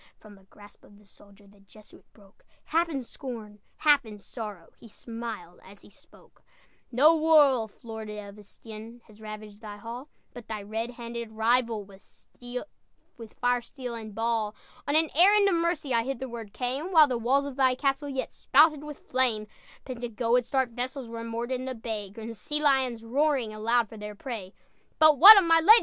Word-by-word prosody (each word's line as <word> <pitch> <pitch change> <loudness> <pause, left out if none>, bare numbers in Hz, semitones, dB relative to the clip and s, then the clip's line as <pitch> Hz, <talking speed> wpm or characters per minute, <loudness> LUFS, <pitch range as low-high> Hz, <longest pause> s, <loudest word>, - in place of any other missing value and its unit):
From 215 -1 -16
the 195 -1 -19
grasp 205 +1 -18
of 205 - -18
the 210 - -22
soldier 200 +1 -19
The 200 0 -21
Jesuit 210 +2 -19
broke, 200 -2 -22 0.2
Half 335 +2 +1
in 275 -5 -3
scorn, 225 -5 -9 0.2
half 295 -2 +4
in 215 -2 -10
sorrow, 205 -4 -9
He - - -14
smiled 225 -6 -8
as 200 +1 -15
he - - -17
spoke: - - -20 0.5
"No 295 +7 +5
wolf, 285 -9 +3
Lord 220 -2 -7
of 210 -1 -9
Estienne, 220 +3 -12
Has 215 0 -18
ravaged 215 -1 -9
thy 210 -2 -8
hall, 235 +7 -8 0.2
But 245 -2 -11
thy 215 -2 -5
red 220 +3 -4
handed 235 -1 -7
rival, 230 -1 +1
With 195 -1 -16 1.4
fire, 245 0 +1
steel, 250 0 -8
and 220 -3 -8
ball! 225 -2 -1 0.3
On 285 - 0
an 320 0 +3
errand 400 +5 +5
of 395 - +2
mercy 335 -5 0
I 230 - +3
hitherward 235 -4 -6
came, 270 - -3
While 315 -4 +7
the 250 -3 -2
walls 270 +5 +2
of 280 -2 -6
thy 260 -2 +3
castle 275 +2 -1
Yet 265 -1 -4
spouted 300 +1 +4
with 300 -1 -10
flame. 245 -5 0 0.4
"Pentagoet's 240 -1 -1
dark 265 -3 0
vessels 250 +1 -5
Were 230 0 -6
moored 230 +2 -4
in 255 0 -2
the 260 -1 -4
bay, 220 -3 -5
Grim 225 +3 -8
sea 295 +7 -4
lions, 260 -6 +1
roaring 265 -2 0
Aloud 230 +2 +1
for 220 - -12
their 210 0 -8
prey." 205 -4 -7 0.4
"But 310 -3 +5
what 415 +5 +12
of 390 - +5
my 330 0 +5
lady?" 435 +8 +8
235 Hz, 180 wpm, -27 LUFS, 215-275 Hz, 1.4 s, what